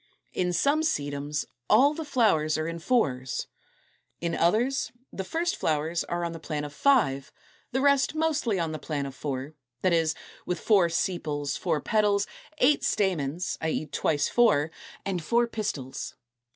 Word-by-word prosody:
In 180 -1 0
some 280 - +2
Sedums 145 - -1 0.2
all 285 +3 +6
the 320 - -4
flowers 210 - +2
are 155 0 -2
in 165 0 -4
fours. 135 - 0 0.7
In 170 -1 -2
others 230 +12 +1 0.2
the 190 - -3
first 340 - -1
flowers 160 - 0
are 175 0 -2
on 170 - -2
the 165 - -7
plan 150 -2 -3
of 145 -1 -6
five, 145 - +2 0.4
the 265 +1 0
rest 280 +1 +3
mostly 305 -9 +1
on 165 -2 -1
the 155 - -4
plan 145 -3 -3
of 135 - -6
four, 135 +1 -4 0.3
that 185 -2 +3
is, 160 -1 +2 0.3
with 180 - -2
four 195 -6 +4
sepals, 155 -6 -1
four 150 - -1
petals, 205 0 +2 0.3
eight 290 +1 +4
stamens 180 -5 0
(i. 160 - 0
e. 155 - -1
twice 150 -1 0
four), 160 -11 +3 0.3
and 185 -4 -2
four 235 +8 +3
pistils. 205 - -4
170 Hz, 160 wpm, -27 LUFS, 150-235 Hz, 0.7 s, all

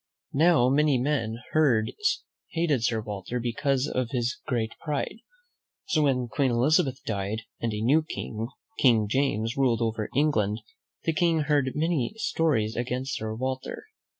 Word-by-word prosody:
Now, 155 -3 +5
many 145 +1 +3
men 120 -4 0 0.2
hated 155 - 0
Sir 115 -2 +1
Walter 105 +3 -4
because 130 +3 0
of 125 -4 -1
his 120 0 -1
great 115 -5 0
pride; 150 +6 -3 0.7
so, 155 - +1
when 130 -4 +2
Queen 130 +4 +1
Elizabeth 130 +1 +2
died, 105 +1 -2 0.2
and 115 - -1
a 105 0 -3
new 145 +7 +4
King, 115 -7 -5 0.3
King 115 -5 +4
James, 115 -2 0
ruled 125 -4 +2
over 110 -1 -2
Eng 150 +3 +4
land, 105 -3 0 0.4
the 165 - +1
King 165 0 +2
heard 145 -3 +1
many 155 - 0
stories 140 - +1
against 130 +3 -2
Sir 110 0 -4
Walter. 130 +2 -4
130 Hz, 145 wpm, -27 LUFS, 115-150 Hz, 0.7 s, Now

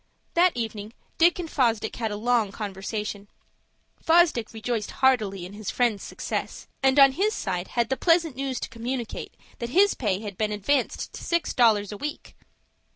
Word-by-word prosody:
That 350 -5 +3
evening 220 -2 -4 0.3
Dick 340 +1 +5
and 350 -2 -4
Fosdick 230 -7 0
had 225 -2 -1
a 205 - -4
long 225 -1 +1
conversation. 205 0 -5 0.8
Fosdick 325 -9 +3
rejoiced 225 -1 -3
heartily 215 -9 +1
in 185 - -10
his 210 -1 -6
friend's 235 -5 +1
success, - - -5 0.2
and 265 0 +3
on 275 -1 +8
his 400 +10 0
side 180 -3 -3
had 235 -2 -1
the 265 - 0
pleasant 330 -4 +2
news 265 -1 -3
to - - -4
communicate 235 0 -5 0.2
that 235 - -4
his 390 +9 +4
pay 200 -6 -1
had 205 -4 -7
been 215 -1 0
advanced 230 +6 -1
to - - -8
six 340 0 0
dollars 215 -5 +3
a 205 - -6
week. 295 +7 -6
235 Hz, 170 wpm, -25 LUFS, 210-275 Hz, 0.8 s, on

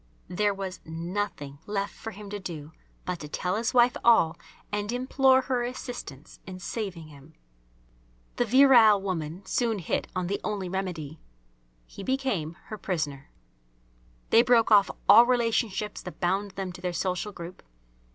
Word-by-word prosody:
There 205 +3 +1
was 195 -2 -5
nothing 165 -4 -4
left 200 -1 -2
for 225 - -8
him 205 -1 -10
to 205 - -4
do 160 -5 -7 0.3
but 180 -2 -3
to 150 - -7
tell 180 +5 -2
his 225 +2 0
wife 245 0 +4
all 175 -9 +5 0.4
and 205 +1 -2
implore 260 +1 +3
her 255 -2 -1
assistance 240 - -7
in 185 -1 -7
saving 180 -4 -5
him. 145 +2 -16 1.0
The 245 - +2
virile 240 -4 +7
woman 180 -1 -4
soon 230 +2 0
hit 180 - -2
on 185 -1 -1
the 200 +3 -2
only 200 -4 -3
remedy. 175 -5 -4 0.7
He - - -11
became 210 - -1
her 215 - -6
prisoner. 150 -8 -3 1.0
They 230 - +7
broke 235 -2 +3
off 205 -2 +6 0.2
all 235 +1 +9
relationships 230 -4 0
that 180 - -9
bound 190 +3 0
them 190 -2 -5
to 180 - -11
their 180 -1 -2
social 185 +4 -2
group. 175 -1 -9
195 Hz, 150 wpm, -27 LUFS, 175-225 Hz, 1.0 s, all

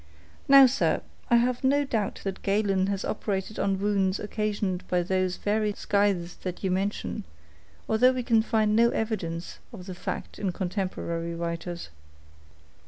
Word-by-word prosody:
Now, 275 -1 +9
sir, 260 +2 +1 0.3
I 240 - +5
have 245 +2 +2
no 285 +2 +3
doubt 220 -6 -2
that 195 -1 -4
Galen 195 -2 +1
has 200 -1 -2
operated 205 -1 -3
on 195 -1 +1
wounds 195 -1 +1
occasioned 205 -3 -2
by 180 -1 +1
these 185 0 0
very 210 0 0
scythes 200 -4 0
that 180 +1 -6
you 190 - +1
mention, 190 - -2 0.6
although 240 +4 +5
we 255 -1 -2
can 230 -2 +4
find 220 -2 +1
no 235 +1 +5
evidence 180 -8 -3
of 185 -6 -10
the 185 - -6
fact 175 - -6
in 190 -3 -1
contemporary 175 -3 -3
writers. 170 - -4
200 Hz, 150 wpm, -27 LUFS, 185-220 Hz, 0.6 s, Now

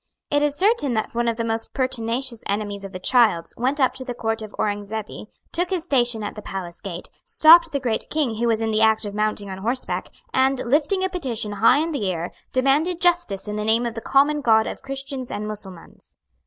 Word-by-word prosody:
It 290 0 +3
is 295 -1 +1
certain 380 - +2
that 220 - -2
one 235 0 0
of 230 -1 0
the 230 - -1
most 225 0 -3
pertinacious 255 -2 -1
enemies 205 0 -3
of 195 - -7
the 185 - -6
Childs 215 -4 +2
went 265 +5 -1
up 260 -2 +3
to 260 0 -4
the 245 -2 -5
Court 225 -1 -2
of 215 -1 -8
Aurengzebe, 205 +1 -3 0.2
took 350 +1 -1
his 370 -4 -1
station 240 -8 +1
at 205 - -4
the 210 - -9
palace 180 -4 -7
gate, 180 -3 -7
stopped 330 +1 +6
the 280 - -1
Great 240 -4 -1
King 275 -8 -1
who 235 +1 0
was 225 -1 +1
in 225 0 0
the 215 0 +1
act 220 0 +3
of 205 - -5
mounting 210 -1 -1
on 190 - -6
horseback, 240 +6 -2 0.2
and, 265 +1 +3
lifting 300 +9 +2
a 380 - +1
petition 250 - -3
high 230 +5 +4
in 320 +3 0
the 210 -11 -1
air, 170 0 -4 0.2
demanded 290 +7 +2
justice 345 - +1
in 210 0 -3
the 210 - -2
name 225 +3 +2
of 235 - -2
the 225 - -6
common 290 +4 +3
God 220 -4 +4
of - - -6
Christians 270 -1 -6
and 210 +1 -4
Mussulmans. 195 -5 -9
235 Hz, 220 wpm, -23 LUFS, 215-275 Hz, 0.2 s, stopped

